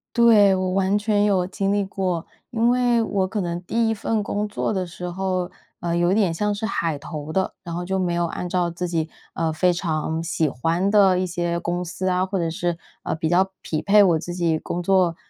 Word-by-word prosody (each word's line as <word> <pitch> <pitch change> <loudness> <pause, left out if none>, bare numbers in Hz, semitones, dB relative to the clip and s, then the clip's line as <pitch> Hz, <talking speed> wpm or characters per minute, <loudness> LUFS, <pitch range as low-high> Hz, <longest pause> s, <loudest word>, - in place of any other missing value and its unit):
对， 220 -4 +6
我 185 -1 0
完 195 +1 +2
全 205 -1 +2
有 190 -3 +2
经 195 +1 -1
历 205 -1 +1
过。 185 -3 -2 0.2
因 230 0 +1
为 245 -1 +3
我 200 -3 0
可 205 +3 -3
能 175 -1 -2
第 225 +5 0
1 225 - +2
份 220 +1 -1
工 205 0 -2
作 210 +1 -2
的 190 -2 -1
时 180 +1 -6
候， 185 0 -2 0.3
呃， 170 -1 -1
有 175 +1 +2
一 - - +3
点 195 -6 +2
像 210 +5 0
是 210 +2 -3
海 165 -8 -1
投 150 -1 -6
的。 190 +3 0
然 170 - -6
后 175 +1 -3
就 190 +1 -1
没 180 -2 0
有 170 0 +1
按 175 +1 -4
照 175 -1 +1
自 175 +1 -4
己， 165 -2 -1 0.3
呃， 165 -1 0
非 180 +3 +3
常 160 -2 -2
喜 165 -2 0
欢 165 +9 0
的 195 -3 +5
一 185 - 0
些 175 -1 -2
公 175 +1 -2
司 185 +2 -3
啊， 180 0 +1
或 190 +1 -2
者 170 -2 0
是， 170 +1 -2 0.3
呃， - - -2
比 160 0 -1
较 185 +3 +3
匹 155 -1 -2
配 205 +1 +6
我 170 -5 +3
自 175 +2 -6
己 170 -3 0
工 175 +3 -4
作 185 -2 +3
180 Hz, 245 characters per minute, -23 LUFS, 170-200 Hz, 0.3 s, 对